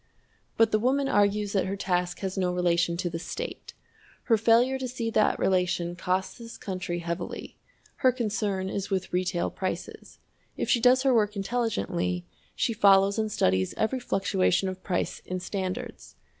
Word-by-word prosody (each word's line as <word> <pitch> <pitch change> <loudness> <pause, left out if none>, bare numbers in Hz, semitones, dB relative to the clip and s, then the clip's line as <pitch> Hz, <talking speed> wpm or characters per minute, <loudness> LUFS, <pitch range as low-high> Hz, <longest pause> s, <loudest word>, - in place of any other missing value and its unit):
But 225 -1 +4
the 215 - +3
woman 270 +4 +1
argues 205 -2 +2
that 195 -2 +1
her 195 - -2
task 180 -2 -1
has 190 -1 -3
no 185 -2 0
relation 170 -1 +1
to 175 - -2
the 165 -1 -4
state. 470 - -6 0.5
Her 230 - +4
failure 235 +4 +3
to 260 - -3
see 235 -2 -3
that 215 - +3
relation 180 -2 0
costs 185 +3 -2
this 230 0 -9
country 185 -3 -4
heavily. 170 +1 -5 0.4
Her 255 - +4
concern 210 -5 -2
is 195 0 -3
with 190 -2 -2
retail 180 -1 0
prices. 185 -2 -5 0.4
If - - -1
she 245 - +4
does 250 +2 +5
her 265 -2 +4
work 210 -2 +2
intelligently, 100 - -1 0.3
she 230 - 0
follows 200 0 +5
and 215 -1 -1
studies 95 - +1
every 255 +4 0
fluctuation 195 -4 +1
of 185 0 -7
price 180 -2 -2
in 185 0 -4
standards. 185 0 -5
195 Hz, 165 wpm, -27 LUFS, 180-225 Hz, 0.5 s, does